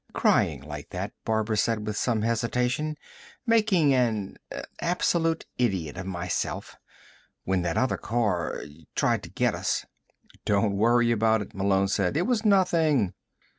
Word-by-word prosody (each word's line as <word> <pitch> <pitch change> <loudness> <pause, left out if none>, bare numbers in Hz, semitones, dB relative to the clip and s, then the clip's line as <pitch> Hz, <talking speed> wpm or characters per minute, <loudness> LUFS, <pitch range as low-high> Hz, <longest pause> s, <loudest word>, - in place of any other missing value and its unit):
"Crying 70 -4 +2
like 75 0 -8
that," - - -4
Barbara 110 0 0
said 110 0 0
with 105 - -3
some 110 -1 0
hesitation. 125 +6 0 0.5
"Making 210 - +4
an 110 -6 0 0.4
absolute 170 -1 +1
idiot 95 -11 0
of 95 0 -6
myself. 90 -1 -3 0.7
When 95 -1 0
that 85 -1 -1
other 130 - +1
car 105 -8 -1 0.3
tried - - +2
to - - -10
get - - +1
us." - - -1 0.6
"Don't 100 0 +1
worry 120 +3 +3
about 110 -1 +2
it," - - -14
Malone 95 0 +2
said. 95 +4 0
"It 170 - +2
was 235 -3 +1
nothing." 165 - +3
110 Hz, 135 wpm, -27 LUFS, 95-145 Hz, 0.7 s, Making